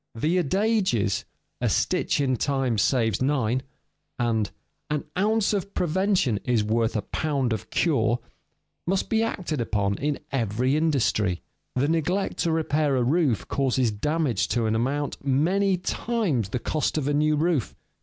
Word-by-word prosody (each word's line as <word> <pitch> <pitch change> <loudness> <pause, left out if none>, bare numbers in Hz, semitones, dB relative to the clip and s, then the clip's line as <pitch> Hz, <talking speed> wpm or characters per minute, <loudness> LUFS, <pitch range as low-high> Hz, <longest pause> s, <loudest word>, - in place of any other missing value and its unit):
The 160 +10 +1
adages, 190 - +1 0.4
"A - - +2
stitch - - +1
in 130 -2 +2
time 130 -3 0
saves 115 -3 +2
nine," 130 -3 +1 0.6
and 115 -4 0 0.4
"An 150 -1 -1
ounce 215 +2 +2
of 200 0 -3
prevention 180 - +1
is 120 -4 +1
worth 115 +2 0
a 105 - 0
pound 140 -6 -1
of 110 - -5
cure," 120 -8 +2 0.7
must 190 +1 0
be 225 0 +3
acted 180 - -2
upon 100 -3 0
in 145 0 -1
every 125 +1 0
industry. 125 - +1 0.3
The 130 +3 +2
neglect 165 +5 0
to 165 - +1
repair 155 -3 +1
a 125 - +2
roof 140 - +1
causes 130 -3 +1
damage 150 +4 0
to 120 -2 0
an 110 - +1
amount 135 +7 -1
many 180 +8 +2
times 180 - -1
the 125 - -2
cost 155 +6 -1
of 145 -3 -1
a 145 - +1
new 150 +1 +3
roof. 155 -4 0
140 Hz, 150 wpm, -25 LUFS, 115-165 Hz, 0.7 s, be